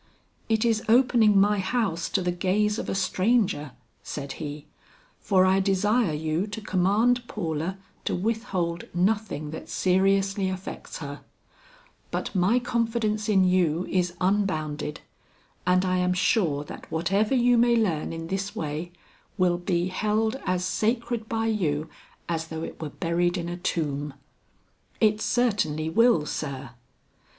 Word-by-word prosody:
"It 220 0 +2
is 225 -2 +2
opening 235 -4 +5
my 205 +1 +3
house 190 -4 -1
to 190 - 0
the 180 - +1
gaze 205 +4 +1
of - - -4
a - - -1
stranger," 190 - +1 0.3
said 140 0 -6
he, 150 -1 -6 0.5
"for 185 -2 +3
I 190 +1 +4
desire 200 +2 +2
you 155 +5 -1
to 205 +1 -5
command 215 +5 +2
Paula 165 -1 -3 0.3
to - - 0
withhold 185 -5 -2
nothing 185 -5 0
that 160 - -8
seriously 195 +1 +2
affects 185 0 -6
her; 145 0 -7 0.9
but - - -3
my 190 +5 +3
confidence 230 -3 -1
in 195 -3 +4
you 180 -2 +2
is 180 -1 0
unbounded 155 -6 -1 0.7
and 185 +1 +3
I 185 0 +1
am 180 0 +2
sure 175 -6 +1
that - - -11
whatever 195 +9 +1
you 245 -1 +4
may 240 0 +4
learn 185 -10 0
in 165 0 -5
this 195 +3 -3
way, 155 +3 -4 0.5
will 175 -1 +2
be 175 0 0
held 215 +4 0
as 180 0 0
sacred 230 +3 -1
by 225 0 0
you 160 -9 0 0.4
as 165 -1 -2
though 160 0 -5
it - - -7
were 155 - -3
buried 175 +3 0
in 170 -1 -3
a 175 0 -4
tomb." 145 -5 -2 0.8
"It 215 -1 +3
certainly 200 -12 +1
will, 230 -6 +4
sir." 135 -5 -5
185 Hz, 140 wpm, -26 LUFS, 165-215 Hz, 0.9 s, opening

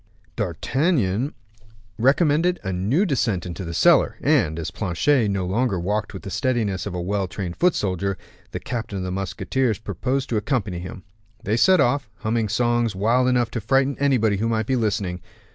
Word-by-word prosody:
D'Artagnan 135 - 0 0.6
recommended 155 +7 +3
a 95 - -2
new 110 - +1
descent 115 - 0
into 90 +1 -6
the 85 - -5
cellar, - - +4
and, 80 +1 +2
as 80 - -4
Planchet 110 - +1
no 100 -2 -1
longer 100 +1 0
walked 105 +4 -2
with 95 - -9
the 95 - -7
steadiness 110 -8 -1
of 95 - -5
a - - -2
well 95 +2 -1
trained 90 -1 -5
foot 180 -1 +2
soldier, 95 0 -1 0.3
the - - -5
captain 115 -4 -4
of 95 - -3
the 90 - -3
musketeers 105 +5 -1
proposed 130 +5 -2
to 115 - 0
accompany 105 -5 -1
him. 90 +1 -8 0.4
They 105 - 0
set 185 +9 +5
off, 140 -2 +1
humming 110 -1 0
songs 120 -2 +1
wild 115 +6 +2
enough 120 -2 +1
to 115 - -3
frighten 135 +5 +2
anybody 120 -7 +2
who 115 +3 0
might 110 -1 0
be 130 - 0
listening. 100 -6 -1
110 Hz, 180 wpm, -23 LUFS, 95-130 Hz, 0.6 s, set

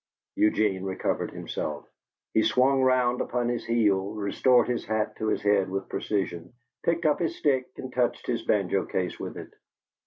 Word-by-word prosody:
Eugene 105 -3 +2
recovered 95 -1 -2
himself. - - -5 0.5
He 110 - +4
swung 130 +5 +3
round 125 -1 +3
upon 120 -1 -1
his 120 -1 -2
heel, 105 -3 +1
restored 120 +4 +3
his 120 -1 -1
hat 110 0 -1
to 110 - -2
his 110 - 0
head 100 -2 +3
with 95 0 -4
precision, 90 -3 -3 0.3
picked 170 0 0
up 150 -1 +3
his 170 -2 -1
stick 130 -3 +1
and 130 -1 -7
touched 125 -1 0
his 115 -2 -1
banjo 100 -3 +1
case 90 -1 -2
with - - -6
it. - - -9
110 Hz, 165 wpm, -27 LUFS, 100-125 Hz, 0.5 s, He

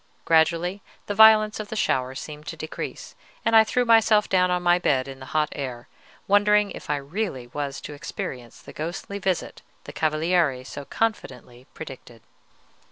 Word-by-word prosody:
Gradually 170 +4 +2 0.2
the 205 - -3
violence 215 0 +6
of 215 - -5
the 220 - -6
shower 130 -10 0
seemed 150 +1 -8
to - - -5
decrease, 155 - -7 0.3
and 225 - +3
I 220 - +9
threw 245 +3 0
myself 220 -2 +4
down 180 -1 +2
on 180 0 0
my 175 0 +4
bed 135 -6 +1
in 135 -1 -9
the 130 - -10
hot 155 -1 0
air, 125 -4 -6 0.4
wondering 205 0 +4
if - - -10
I 150 - +2
really 145 - -4
was 140 +2 -5
to 150 - -8
experience 130 -4 -7
the - - -12
ghostly 175 +5 -5
visit 190 -3 -2 0.2
the - - -10
Cavaliere 155 -3 +1
so 140 +1 -8
confidently 130 - -4
predicted. 130 -7 -10
160 Hz, 165 wpm, -24 LUFS, 135-205 Hz, 0.4 s, I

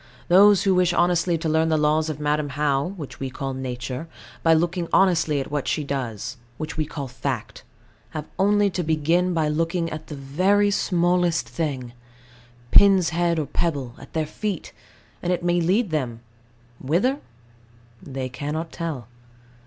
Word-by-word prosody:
Those 200 +2 +7
who 195 - +3
wish 180 -1 +3
honestly 175 0 +2
to 165 0 -3
learn 160 +1 +2
the 160 - +2
laws 155 +1 +2
of 150 -2 -4
Madam 150 0 0
How, 140 0 0
which 150 -5 -8
we 135 - -3
call 135 +1 -4
Nature, 130 +2 -5 0.3
by 165 -1 +5
looking 170 +1 0
honestly 165 -6 +3
at 135 - -5
what 145 -2 -2
she 150 - 0
does, 130 -3 -4 0.2
which 155 +1 -5
we 155 -2 -1
call 145 -3 -5
Fact, 125 -2 -4 0.5
have 155 -1 -6
only 205 +1 +3
to 180 - -2
begin 165 +3 +1
by 160 -2 +2
looking 165 +2 -1
at 155 0 -7
the 150 - -6
very 185 +10 +2
smallest 175 - +1
thing, 130 -2 -3 0.8
pin's 195 -4 +6
head 170 0 +1
or 155 - 0
pebble, 140 -4 -2
at - - -13
their 160 -1 0
feet, 200 +3 -4 0.5
and 175 - -1
it 175 -1 -1
may 175 0 +2
lead 190 +4 +1
them 125 -7 -2 0.6
whither, 195 - +1 0.8
they 135 -2 -5
cannot 150 +5 -4
tell. 155 -9 -5
160 Hz, 160 wpm, -24 LUFS, 140-175 Hz, 0.8 s, Those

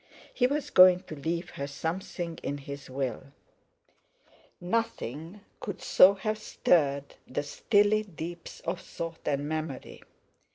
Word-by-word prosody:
He 250 - +3
was 290 +1 -2
going 185 -1 +8
to 160 - -8
leave 170 +4 -3
her 140 - -4
something 170 +3 -4
in 145 - -3
his 140 0 -8
Will; 130 -2 -3 1.3
nothing 180 - -3 0.2
could 200 -2 -5
so 195 +2 +6
have 215 +2 -2
stirred 140 -9 +1
the 140 +3 -2
stilly 205 +7 +3
deeps 175 -4 -8
of 170 +2 -3
thought 165 -1 -7
and 145 0 0
memory. 155 -3 -4
170 Hz, 125 wpm, -29 LUFS, 145-195 Hz, 1.3 s, going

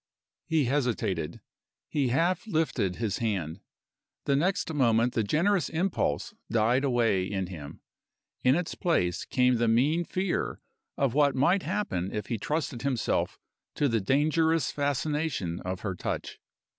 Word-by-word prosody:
He 160 -4 +2
hesitated. 125 -2 -1 0.5
He 145 -4 0
half 170 - +1
lifted 155 - 0
his 110 -4 -2
hand. 95 -7 -2 0.7
The 140 - +2
next 170 +2 0
moment 120 -3 +3
the 115 - +1
generous 175 - +2
impulse 165 - -1 0.2
died 120 +4 +2
away 120 -8 +2
in 95 -1 -2
him. 80 -6 -9 0.6
In 130 +2 +5
its 175 0 -2
place 90 - 0
came 125 -1 +3
the 115 0 +1
mean 140 +10 +3
fear 185 +2 -2 0.4
of 135 -4 +1
what 145 -1 +3
might 170 +9 +3
happen 95 - -2
if 105 - -3
he 115 - -1
trusted 150 -2 -2
himself 130 -4 0 0.4
to 145 - +2
the 115 -4 +1
dangerous 155 +7 +2
fascination 145 - -1
of 90 0 -4
her 100 -3 -2
touch. 90 - -4
130 Hz, 140 wpm, -28 LUFS, 110-160 Hz, 0.7 s, In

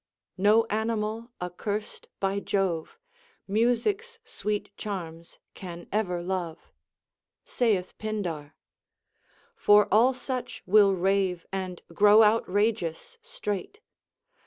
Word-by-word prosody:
No 215 +3 +5
animal 220 +1 -2
accurst 200 +4 -5
by 195 0 0
Jove 190 - -1 0.5
Music's 245 - 0
sweet 210 - -4
charms 170 -5 -7 0.2
can 175 -2 -9
ever 180 -5 -1
love,* 175 -3 -4 0.7
saith 205 -7 0
Pindar. 175 -9 -4 1.0
For 210 - +5
all 245 +5 +5
such 255 0 -5
will 200 0 +5
rave 190 -1 0
and 185 -2 -4
grow 210 +4 +7
outrageous 210 -5 0
straight. 210 - -5
205 Hz, 90 wpm, -27 LUFS, 180-220 Hz, 1.0 s, grow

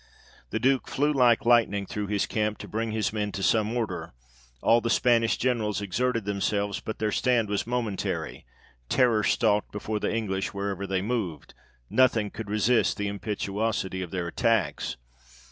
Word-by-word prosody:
The 110 - -2
Duke 130 +2 +2
flew 145 +2 +1
like 120 -4 +4
lightening 115 -4 +3
through 105 +1 -4
his 100 -1 0
camp, 105 -1 -1
to - - -9
bring 110 +1 -2
his 110 -1 -1
men 105 -1 -1
to 100 - -4
some 110 +3 +2
order; 90 -8 -3 0.5
all 115 - +4
the 115 - -2
Spanish 115 0 +3
Generals 115 -5 0
exerted 115 +3 -1
themselves, 100 0 -1
but 110 - -6
their 110 -1 -1
stand 120 -3 +1
was 105 +1 -1
momentary; 120 -5 -3 0.5
terror 120 -5 +3
stalked 105 -2 +2
before 105 +1 -3
the - - -1
English 100 -4 -2
wherever 100 -1 -3
they 95 -1 -1
moved 105 -8 -3 0.3
nothing 115 - +3
could 110 -2 -7
resist 110 +3 +2
the 105 - -1
impetuosity 100 -1 -2
of 90 - -5
their 90 0 -3
attacks. 115 +2 0
105 Hz, 160 wpm, -27 LUFS, 100-115 Hz, 0.5 s, like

